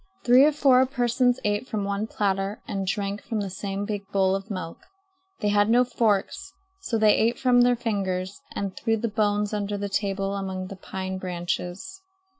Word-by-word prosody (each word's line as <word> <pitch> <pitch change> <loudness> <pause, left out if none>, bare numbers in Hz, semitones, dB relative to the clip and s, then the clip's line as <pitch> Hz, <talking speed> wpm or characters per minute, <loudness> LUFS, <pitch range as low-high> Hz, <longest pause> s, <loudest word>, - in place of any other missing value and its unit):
Three 250 +3 +7
or 305 - +4
four 270 -3 +5
persons 245 -1 +1
ate 205 +4 0
from 215 -4 -2
one 200 +2 -2
platter 195 -1 -1
and 195 -3 -3
drank 200 +1 -2
from 225 - -3
the 200 -2 -3
same 195 +1 -4
big 205 -2 -4
bowl 190 -1 +2
of 195 +2 -3
milk. 185 -5 -5 0.6
They 210 - +1
had 205 +1 +3
no 245 +2 +5
forks, 240 - -1 0.3
so 250 -12 -2
they 215 -1 +5
ate 230 +2 +2
from 250 -2 +4
their 245 0 +4
fingers 195 -5 -2
and 195 -2 -3
threw 225 -1 0
the 230 - -1
bones 210 -1 0
under 205 -1 -2
the 200 0 -3
table 195 -1 -1
among 190 -1 -4
the 195 - -7
pine 190 0 -5
branches. 180 - -4
205 Hz, 185 wpm, -25 LUFS, 195-230 Hz, 0.6 s, Three